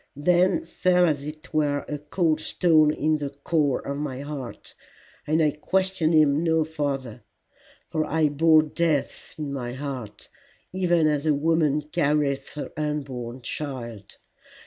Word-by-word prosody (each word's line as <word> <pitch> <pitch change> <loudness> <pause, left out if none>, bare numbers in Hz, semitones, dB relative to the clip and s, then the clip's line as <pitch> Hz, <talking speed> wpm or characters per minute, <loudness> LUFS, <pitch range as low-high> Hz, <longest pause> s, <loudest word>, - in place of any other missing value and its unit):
Then 180 - +2
fell 180 - +2
as 145 -2 -1
it 155 +3 -10
were 145 -2 +1
a 150 - -4
cold 155 +1 0
stone 155 -3 +3
into 150 -1 0
the 140 - -21
core 145 -2 +1
of 140 0 -3
my 140 -3 -4
heart, 140 -4 -7 0.5
and 160 +2 +3
I 150 - +3
questioned 175 +1 0
him 150 0 +4
no 160 -1 +2
farther, 140 -7 -4 0.7
for 155 - +1
I 160 -1 +2
bore 155 +2 +5
death 155 -2 -2
in 150 -3 -4
my 120 -3 -4
heart, 130 -6 -6 0.5
even 175 -3 +2
as 150 0 +1
a 150 - +4
woman 150 -1 +1
carrieth 150 -3 0
her 150 - -6
unborn 135 -5 -4
child. 120 -10 -6
150 Hz, 145 wpm, -25 LUFS, 140-160 Hz, 0.7 s, bore